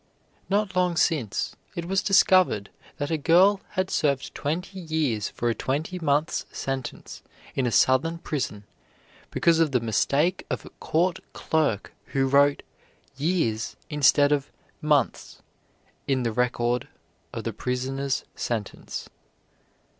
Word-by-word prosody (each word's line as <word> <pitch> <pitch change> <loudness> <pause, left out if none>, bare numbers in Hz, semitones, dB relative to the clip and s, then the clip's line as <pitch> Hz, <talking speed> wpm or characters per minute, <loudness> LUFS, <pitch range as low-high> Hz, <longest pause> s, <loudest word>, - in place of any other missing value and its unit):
Not 200 -1 0
long 180 -1 +2
since, 140 - 0 0.2
it 170 - -4
was 190 +2 +1
discovered 185 - +4 0.3
that 145 0 -3
a 160 - 0
girl 185 +6 +5 0.2
had 185 0 0
served 140 -3 0
twenty 180 +6 -3
years 155 - -1
for 120 - -3
a 120 - +2
twenty 155 +10 -2
months' 150 0 0
sentence, 135 -2 -5 0.3
in 130 -2 0
a - - 0
southern 130 +9 +3
prison, 135 -11 -3 0.7
because 165 -1 +3
of 155 -4 +2
the 125 - +4
mistake 140 - +1
of - - -3
a - - -11
court 170 +2 +1
clerk 150 -10 0
who 135 -1 +1
wrote 140 +1 +4 0.5
"years" 140 -7 0 0.2
instead 145 0 +4
of 145 -1 0 0.3
"months" 150 -4 0 0.6
in 130 -2 +1
the 115 - 0
record 125 0 0 0.4
of - - -5
the - - -3
prisoner's 130 +2 -2
sentence. 110 -4 -4
145 Hz, 130 wpm, -26 LUFS, 125-170 Hz, 0.7 s, girl